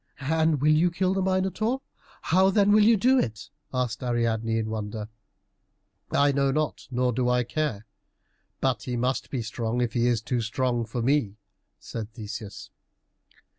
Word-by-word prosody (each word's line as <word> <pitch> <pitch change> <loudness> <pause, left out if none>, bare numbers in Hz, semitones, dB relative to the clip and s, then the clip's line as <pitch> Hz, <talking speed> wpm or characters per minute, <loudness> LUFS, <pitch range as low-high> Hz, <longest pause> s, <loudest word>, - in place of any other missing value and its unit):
"And 160 -3 +2
will 150 +1 +4
you 160 +3 +4
kill 185 +2 0
the 195 - 0
Minotaur? 190 +6 0 0.4
How 190 +3 +4
then 200 +1 +3
will 210 0 +6
you 225 +1 +5
do 255 +6 +4
it?" 110 - -3 0.2
asked 125 -3 -2
Ariadne 115 -2 0
in 110 -1 -2
wonder. 110 0 -4 1.0
"I 140 0 +3
know 140 0 +1
not, 150 +2 -2
nor 125 -1 0
do 125 +1 0
I 125 0 +2
care, 120 -3 -2 0.8
but 130 -5 +1
he 125 +1 -3
must 125 +1 -1
be 125 -4 -3
strong 115 +2 -3
if 120 -2 0
he 120 0 +2
be 120 - +3
too 120 +2 -2
strong 120 +1 -1
for 120 +1 -4
me," 120 -6 +1 0.4
said 110 -1 -7
Theseus. 105 -2 -8
125 Hz, 165 wpm, -26 LUFS, 115-160 Hz, 1.0 s, will